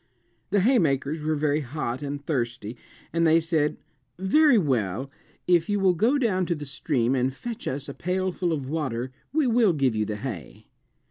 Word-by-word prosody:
The 200 Hz, +1 st, +2 dB
haymakers 160 Hz, -, +2 dB
were 155 Hz, +1 st, 0 dB
very 150 Hz, 0 st, +1 dB
hot 130 Hz, -2 st, -4 dB
and 145 Hz, 0 st, -5 dB
thirsty 120 Hz, -6 st, -2 dB, 0.4 s
and 165 Hz, 0 st, +3 dB
they 160 Hz, +1 st, +5 dB
said, 160 Hz, -2 st, 0 dB, 0.4 s
"Very 265 Hz, -, +4 dB
well; 130 Hz, -, 0 dB, 0.3 s
if 175 Hz, -1 st, +3 dB
you 205 Hz, 0 st, +1 dB
will 190 Hz, -2 st, +4 dB
go 230 Hz, -, +2 dB
down 190 Hz, -9 st, +1 dB
to 170 Hz, -, 0 dB
the 150 Hz, -1 st, -7 dB
stream 130 Hz, -2 st, 0 dB
and 130 Hz, 0 st, +1 dB
fetch 230 Hz, -, -7 dB
us 140 Hz, +2 st, -3 dB
a 140 Hz, -, -6 dB
pailful 180 Hz, +1 st, -1 dB
of 140 Hz, -5 st, -2 dB
water 130 Hz, -5 st, -3 dB, 0.2 s
we 305 Hz, -1 st, +2 dB
will 230 Hz, -6 st, +4 dB
give 135 Hz, -6 st, +1 dB
you 110 Hz, 0 st, 0 dB
the 105 Hz, -, -3 dB
hay." 105 Hz, -, -7 dB
155 Hz, 180 wpm, -25 LUFS, 130-185 Hz, 0.4 s, they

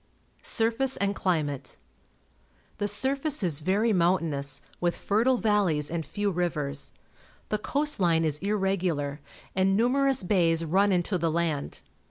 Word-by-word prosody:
Surface 235 Hz, +4 st, +2 dB
and 200 Hz, 0 st, 0 dB
Climate. 155 Hz, -8 st, -2 dB, 0.5 s
— -, -, -36 dB
Tlie 205 Hz, -, +2 dB
surface 270 Hz, +5 st, +2 dB
is 160 Hz, -5 st, 0 dB
very 205 Hz, +7 st, +1 dB
mountainous, 165 Hz, -6 st, 0 dB, 0.2 s
witli 175 Hz, -1 st, +1 dB
fertile 235 Hz, +5 st, +1 dB
valleys 195 Hz, -10 st, +1 dB
and 170 Hz, -1 st, -2 dB
few 205 Hz, +7 st, -2 dB
rivers. 150 Hz, -6 st, -2 dB, 0.6 s
The 215 Hz, -, -1 dB
coast 295 Hz, +5 st, -1 dB
line 165 Hz, -3 st, +2 dB
is 150 Hz, -1 st, 0 dB
irregular, 185 Hz, -7 st, -1 dB, 0.4 s
and 190 Hz, +1 st, +2 dB
numerous 265 Hz, +2 st, +2 dB
bays 165 Hz, -3 st, +2 dB
run 195 Hz, +5 st, +2 dB
into 180 Hz, +1 st, 0 dB
the 165 Hz, 0 st, +1 dB
land. 160 Hz, -3 st, -2 dB
185 Hz, 135 wpm, -27 LUFS, 160-210 Hz, 0.6 s, Surface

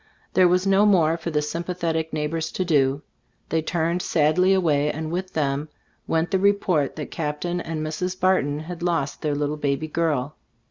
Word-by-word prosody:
There 185 Hz, -1 st, +5 dB
was 180 Hz, +2 st, +2 dB
no 195 Hz, +2 st, +4 dB
more 165 Hz, -5 st, +4 dB
for 170 Hz, 0 st, -5 dB
the 150 Hz, -2 st, 0 dB
sympathetic 165 Hz, 0 st, -2 dB
neighbors 155 Hz, +1 st, -2 dB
to 185 Hz, -, -1 dB
do; 140 Hz, -3 st, +2 dB, 0.5 s
they 160 Hz, 0 st, +1 dB
turned 170 Hz, +2 st, -1 dB
sadly 165 Hz, +5 st, +3 dB
away, 150 Hz, -6 st, +2 dB
and 155 Hz, 0 st, -5 dB
with 185 Hz, +2 st, -3 dB
them 145 Hz, 0 st, -1 dB, 0.4 s
went 165 Hz, +2 st, 0 dB
the 190 Hz, -, +2 dB
report 190 Hz, -7 st, +2 dB
that 150 Hz, -, -6 dB
Cap 150 Hz, -2 st, -3 dB
tain 175 Hz, 0 st, -2 dB
and 160 Hz, -2 st, -4 dB
Mrs. 180 Hz, +4 st, -3 dB
Barton 155 Hz, -6 st, +2 dB
had 175 Hz, +2 st, -7 dB
lost 165 Hz, -5 st, -1 dB
their 150 Hz, -2 st, 0 dB
little 145 Hz, +1 st, -1 dB
baby 145 Hz, +1 st, -1 dB
girl. 150 Hz, -3 st, -1 dB
160 Hz, 180 wpm, -24 LUFS, 150-180 Hz, 0.5 s, There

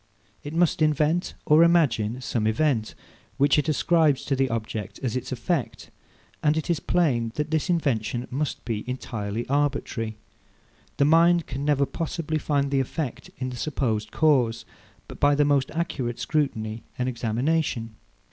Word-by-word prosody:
It 145 Hz, +2 st, -6 dB
must 170 Hz, -2 st, +2 dB
invent 155 Hz, +3 st, +1 dB
or 155 Hz, +2 st, +6 dB
imagine 130 Hz, -9 st, +2 dB
some 110 Hz, -4 st, -1 dB
event, 115 Hz, -1 st, 0 dB, 0.4 s
which 140 Hz, +1 st, +4 dB
it 150 Hz, -, -1 dB
ascribes 155 Hz, -2 st, +2 dB
to 140 Hz, -, 0 dB
the 135 Hz, 0 st, +1 dB
object 110 Hz, -3 st, -4 dB
as 125 Hz, -3 st, -1 dB
its 125 Hz, -, -4 dB
effect; 130 Hz, +3 st, -2 dB, 0.5 s
and 150 Hz, +1 st, +2 dB
it 160 Hz, +2 st, -1 dB
is 165 Hz, -, 0 dB
plain 125 Hz, -10 st, +1 dB
that 150 Hz, +1 st, -2 dB
this 160 Hz, +3 st, 0 dB
invention 125 Hz, -8 st, 0 dB
must 145 Hz, +3 st, -3 dB
be 110 Hz, -3 st, -2 dB
entirely 115 Hz, -3 st, -4 dB
arbitrary. 130 Hz, -6 st, -1 dB, 0.8 s
The 140 Hz, -, +4 dB
mind 170 Hz, +2 st, +5 dB
can 135 Hz, +3 st, -5 dB
never 145 Hz, -1 st, +2 dB
possibly 160 Hz, 0 st, -3 dB
find 140 Hz, -2 st, 0 dB
the 135 Hz, -, +2 dB
effect 135 Hz, 0 st, -4 dB
in 130 Hz, -1 st, -3 dB
the 125 Hz, -, -7 dB
supposed 115 Hz, -6 st, -1 dB
cause, 130 Hz, -8 st, +2 dB, 0.5 s
by 145 Hz, 0 st, +4 dB
the 145 Hz, 0 st, +3 dB
most 140 Hz, -2 st, +2 dB
accurate 135 Hz, -8 st, -3 dB
scrutiny 115 Hz, -8 st, -1 dB, 0.2 s
and 125 Hz, -, -1 dB
examination. 120 Hz, 0 st, -1 dB
140 Hz, 150 wpm, -25 LUFS, 120-155 Hz, 0.8 s, or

